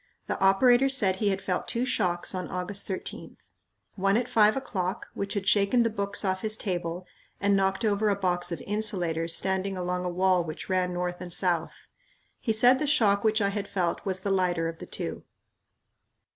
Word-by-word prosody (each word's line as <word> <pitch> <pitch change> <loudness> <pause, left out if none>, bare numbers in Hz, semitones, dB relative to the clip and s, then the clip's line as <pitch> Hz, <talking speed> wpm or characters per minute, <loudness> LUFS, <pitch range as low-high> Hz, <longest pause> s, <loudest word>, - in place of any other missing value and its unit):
The - - -3
operator 245 +7 +5
said 200 -9 +2
he 205 0 +1
had 195 0 -2
felt 180 -1 -2
two 235 +2 -1
shocks 180 -8 -1
on 185 -1 -4
August 185 +2 -3
13th 190 - -6 0.6
one 195 +1 +1
at 245 0 -1
five 215 +1 +4
o'clock, 190 -8 -3
which 200 +1 -4
had 200 -1 -3
shaken 205 +5 +4
the 230 - 0
books 200 0 -2
off 190 -1 0
his 215 -1 -1
table 175 -3 -3 0.3
and 200 0 +2
knocked 195 +3 +1
over 210 0 +2
a 200 - +2
box 175 -2 -1
of 170 - -4
insulators 175 -6 0
standing 190 0 0
along 180 0 -2
a 180 - -2
wall 180 0 +2
which 155 +2 -7
ran 185 -1 +1
north 180 0 -3
and 180 -1 -7
south. 170 -2 0 0.7
He 225 - -1
said 245 +4 +5
the 300 - -1
shock 205 -8 +3
which 220 0 +2
I 200 - +2
had 200 0 -3
felt 180 -4 -1
was 190 -1 -1
the 200 - -2
lighter 180 -3 +1
of 165 0 -6
the - - -9
two. - - -5
195 Hz, 195 wpm, -27 LUFS, 180-210 Hz, 0.7 s, operator